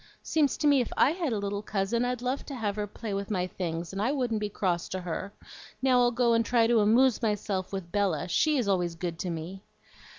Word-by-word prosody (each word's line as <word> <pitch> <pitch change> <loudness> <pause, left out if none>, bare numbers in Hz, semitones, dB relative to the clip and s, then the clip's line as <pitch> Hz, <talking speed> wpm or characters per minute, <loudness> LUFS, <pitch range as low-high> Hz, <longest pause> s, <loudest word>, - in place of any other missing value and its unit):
Seems 295 -5 +1
to 300 - -2
me 285 -3 +5
if 240 - -4
I 275 - +5
had 330 -4 -2
a 220 - 0
little 200 0 -3
cousin, 210 +4 -1
I'd 245 -1 -2
love 255 +2 -1
to 280 - -5
have 210 -5 -2
her 210 -1 -2
play 210 +1 -6
with 200 0 -3
my 185 -4 0
things, 170 -1 -4
and 195 - -3
I 235 +5 +1
wouldn't 245 -6 -1
be 210 -1 -2
cross 180 -4 -1
to 185 - -4
her. 180 +3 -4 0.5
Now 260 -1 +3
I'll 240 0 +4
go 240 -1 +2
and 230 0 +3
try 230 0 +3
to 230 0 +4
AMOOSE 235 +4 +4
myself 205 -4 -1
with 190 -3 -5
Bella; 190 -7 0
SHE 300 - +2
is 240 -5 0
always 175 -3 0
good 165 0 -4
to 180 - -3
me." 170 +3 -6
210 Hz, 240 wpm, -28 LUFS, 185-245 Hz, 0.5 s, me